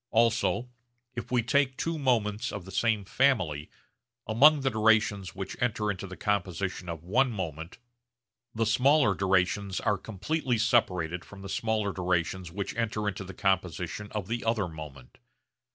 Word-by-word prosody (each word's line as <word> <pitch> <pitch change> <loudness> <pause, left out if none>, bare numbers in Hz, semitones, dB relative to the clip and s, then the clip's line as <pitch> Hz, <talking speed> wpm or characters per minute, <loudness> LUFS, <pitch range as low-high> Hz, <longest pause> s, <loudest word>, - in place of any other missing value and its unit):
Also 115 +1 +2 0.5
if 120 - -6
we 125 -2 +2
take 130 +2 +2
two 165 -1 -2
moments 115 -4 +1
of 100 -4 -6
the 95 - -10
same 110 0 +1
family, 95 - +1 0.6
among 145 +7 +6
the 135 0 +1
durations 110 -4 +2
which 95 0 -5
enter 105 -3 +1
into 100 0 -6
the 95 - -9
composition 95 -2 -2
of 80 -2 -6
one 125 +9 +2
moment 80 -5 -5 0.8
the 115 0 +1
smaller 125 +1 +4
durations 95 +1 +1
are 105 -2 0
completely 120 - -2
separated 90 -7 +1
from 100 -1 -12
the - - -6
smaller 110 -1 0
durations 90 0 -1
which 100 +2 -4
enter 110 -2 -1
into 100 -1 -3
the 95 0 -10
composition 95 +1 -1
of 105 -4 -4
the 115 +2 -2
other 115 -4 +1
moment. 75 -6 -10
105 Hz, 150 wpm, -28 LUFS, 95-115 Hz, 0.8 s, among